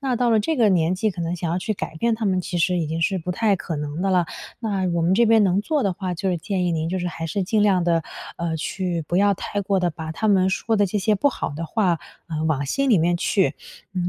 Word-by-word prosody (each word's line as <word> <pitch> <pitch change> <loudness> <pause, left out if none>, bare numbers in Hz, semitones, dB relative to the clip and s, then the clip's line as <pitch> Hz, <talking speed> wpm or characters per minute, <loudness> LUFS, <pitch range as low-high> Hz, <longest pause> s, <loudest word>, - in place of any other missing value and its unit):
那 265 -3 0
到 240 0 +2
了 220 - +4
这 310 +9 -1
个 220 -4 +4
年 175 0 +2
纪 215 +3 0
可 180 - -7
能 170 +1 -2
想 165 0 -3
要 175 - 0
去 215 +3 -2
改 160 - -5
变 230 +7 +1
他 220 0 -4
们 185 -2 +1
其 180 0 -4
实 180 +1 +2
已 165 - -1
经 160 +2 -2
是 190 +2 +1
不 180 +2 -4
太 205 +2 +2
可 165 -2 -5
能 150 +2 -4
的 195 - 0
了， 180 -2 +3 0.3
那 200 -5 -1
我 170 - 0
们 175 +3 +2
这 235 +4 +4
边 220 -2 +5
能 190 +1 +2
做 295 +5 0
的 195 - +1
话 180 0 -4
就 190 +2 -1
是 175 - -1
建 185 +2 -2
议 175 - +1
您 160 0 -1
就 185 +2 -1
是 180 - -2
还 165 -1 -5
是 190 +4 -1
尽 210 +3 +1
量 190 -4 +3
地， 170 -1 +2 0.4
呃， 165 -1 -2
去 175 +1 -2
不 175 - -1
要 200 0 +4
太 205 +2 -4
过 195 -2 +2
地 175 - +1
把 160 0 -6
他 220 +6 -1
们 190 -2 +4
说 220 +3 0
的 205 -1 +3
这 210 - -3
些 215 +2 +2
不 285 - +3
好 - - -3
的 165 - -4
话， 180 -4 +1 0.3
呃， 155 -1 -2
往 150 -3 0
心 275 - 0
里 215 -8 +5
面 175 +2 +2
去。 190 +2 +1 0.4
嗯， 180 -1 -1
185 Hz, 310 characters per minute, -23 LUFS, 170-205 Hz, 0.4 s, 边